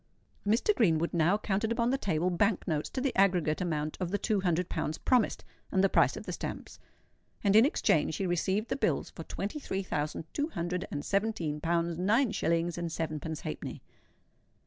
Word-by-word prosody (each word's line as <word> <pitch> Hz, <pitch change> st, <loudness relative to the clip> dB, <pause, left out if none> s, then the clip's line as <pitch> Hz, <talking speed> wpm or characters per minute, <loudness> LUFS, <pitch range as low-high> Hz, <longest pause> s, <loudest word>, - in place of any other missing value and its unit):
Mr. 230 Hz, -, +3 dB
Greenwood 170 Hz, -6 st, +2 dB
now 170 Hz, +4 st, +3 dB
counted 215 Hz, +1 st, -1 dB
upon 235 Hz, +1 st, +1 dB
the 270 Hz, -, +2 dB
table 180 Hz, -, 0 dB
bank 200 Hz, +3 st, +1 dB
notes 155 Hz, -3 st, -1 dB
to -, -, -4 dB
the 265 Hz, 0 st, -1 dB
aggregate 180 Hz, -5 st, +3 dB
amount 155 Hz, -3 st, -2 dB
of 180 Hz, -2 st, -2 dB
the 205 Hz, -, 0 dB
two 210 Hz, -1 st, 0 dB
hundred 180 Hz, -1 st, +1 dB
pounds 155 Hz, -, -2 dB
promised, 250 Hz, -5 st, +1 dB, 0.3 s
and 190 Hz, -, +2 dB
the 195 Hz, -, +5 dB
price -, -, +3 dB
of -, -, -8 dB
the -, -, -4 dB
stamps; -, -, -6 dB, 0.6 s
and 200 Hz, -1 st, +3 dB
in 225 Hz, +5 st, +8 dB
exchange 160 Hz, -, +1 dB
he 195 Hz, -, -2 dB
received 190 Hz, +5 st, 0 dB
the -, -, 0 dB
bills -, -, 0 dB
for -, -, -9 dB
twenty 205 Hz, +10 st, -4 dB
three 195 Hz, -8 st, -3 dB
thousand 150 Hz, -3 st, -2 dB
two 290 Hz, +1 st, 0 dB
hundred 175 Hz, -, -3 dB
and 145 Hz, 0 st, -4 dB
seventeen 195 Hz, -7 st, -1 dB
pounds, 170 Hz, 0 st, 0 dB
nine 220 Hz, +6 st, +3 dB
shillings, 170 Hz, -3 st, 0 dB
and 170 Hz, -1 st, -3 dB
sevenpence 160 Hz, -1 st, -3 dB
halfpenny. -, -, -6 dB
180 Hz, 190 wpm, -30 LUFS, 165-210 Hz, 0.6 s, in